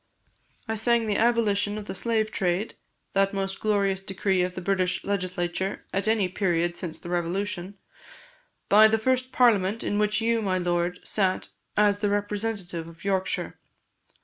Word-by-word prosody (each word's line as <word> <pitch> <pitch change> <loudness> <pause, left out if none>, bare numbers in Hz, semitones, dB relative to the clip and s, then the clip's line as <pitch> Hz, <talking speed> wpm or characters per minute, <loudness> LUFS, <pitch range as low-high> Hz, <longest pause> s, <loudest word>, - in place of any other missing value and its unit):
I 225 - -1
sang 230 +1 +2
the 210 -2 0
abolition 215 -3 +2
of 210 - -6
the - - -5
slave 220 +1 0
trade, 190 +1 -1 0.4
that 195 0 +2
most 195 0 -3
glorious 200 -3 +1
decree 195 -1 0
of 180 0 -2
the - - -3
British 185 -1 0
Legislature 185 -1 -2
at 195 +2 0
any 215 -3 +2
period 175 -2 0
since 170 -3 -4
the 175 - -8
Revolution, 185 +2 -2 0.9
by 215 +2 +7
the 220 +1 +2
first 255 +3 0
Parliament 225 -4 +3
in 205 - -1
which 210 0 +2
you, 230 0 +1
my 190 -3 0
Lord, 175 0 -1
sat 190 -3 0 0.3
as 205 -1 +4
the 205 -1 +1
representative 205 -4 -3
of 165 0 -14
Yorkshire. 190 -1 -1
200 Hz, 155 wpm, -26 LUFS, 185-215 Hz, 0.9 s, by